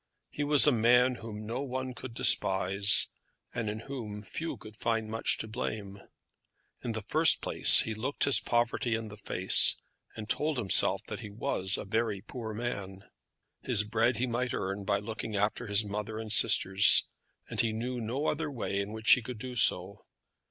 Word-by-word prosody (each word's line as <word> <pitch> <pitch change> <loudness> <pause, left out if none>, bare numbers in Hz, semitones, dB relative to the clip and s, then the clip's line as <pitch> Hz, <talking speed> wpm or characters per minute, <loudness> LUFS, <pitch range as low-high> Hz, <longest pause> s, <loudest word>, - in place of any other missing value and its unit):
He 145 - -4
was 145 -1 +4
a 150 - +5
man 125 +2 +3
whom 110 -1 -9
no 120 +4 -5
one 130 -1 -5
could 125 -1 -10
despise, 95 0 +3 0.4
and 110 -2 -4
in 110 +1 -6
whom 115 -6 -8
few 160 - -6
could 110 0 -13
find 115 0 -2
much 115 - -1
to - - -6
blame. 105 -3 -6 0.8
In 120 - -4
the 110 -1 -6
first 155 +9 +4
place - - +8
he 110 - -3
looked 125 +7 -4
his 140 - +4
poverty 120 0 -1
in 115 -1 -6
the 105 - -12
face, 95 -2 +2 0.4
and 110 -1 -8
told 150 +6 -1
himself 105 -6 +1
that - - -8
he 105 - -9
was 100 -2 0
a - - -7
very 110 0 -2
poor 115 +1 -8
man. 100 -4 -7 0.5
His 105 - +2
bread 115 +2 -1
he 125 - -1
might 125 0 -3
earn 100 +1 -5
by 100 - 0
looking 110 +1 -7
after 105 +4 -2
his 105 +1 +1
mother 105 +2 -6
and 110 -1 -7
sisters, 95 +1 +5 0.4
and - - -2
he 115 - -1
knew 120 +3 -5
no 125 +7 -4
other 155 0 -2
way 115 -7 -4
in 100 +2 -5
which 110 0 0
he 125 - +6
could 120 +1 -8
do 125 +2 -8
so. 95 -3 +1
110 Hz, 185 wpm, -29 LUFS, 105-125 Hz, 0.8 s, place